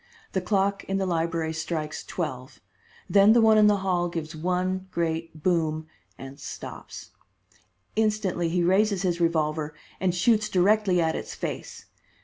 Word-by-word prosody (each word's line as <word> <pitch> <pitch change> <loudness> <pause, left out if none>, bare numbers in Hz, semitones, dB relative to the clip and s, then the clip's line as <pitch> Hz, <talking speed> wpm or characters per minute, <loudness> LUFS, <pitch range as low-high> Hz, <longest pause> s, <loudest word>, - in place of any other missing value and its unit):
The 190 - -1
clock 200 +1 0
in 195 - -1
the 195 - 0
library 165 -2 -1
strikes 160 -1 -4
twelve, 130 -6 -5 0.5
then 200 +2 +6
the 235 - +5
one 220 -1 +6
in 210 - +6
the 205 -1 +4
hall 175 -2 +1
gives 165 -2 -5
one 185 +3 -1
great 165 -2 -3
boom, 160 -3 +1 0.3
and 135 +2 -10
stops. - - -9 0.8
Instantly 210 -6 0
he 175 +1 +1
raises 195 +2 +2
his 175 -2 0
revolver 155 -2 0 0.2
and 185 -2 0
shoots 215 +3 +2
directly 190 0 +3
at 160 -1 +1
its - - -6
face. - - -6
175 Hz, 145 wpm, -26 LUFS, 160-195 Hz, 0.8 s, then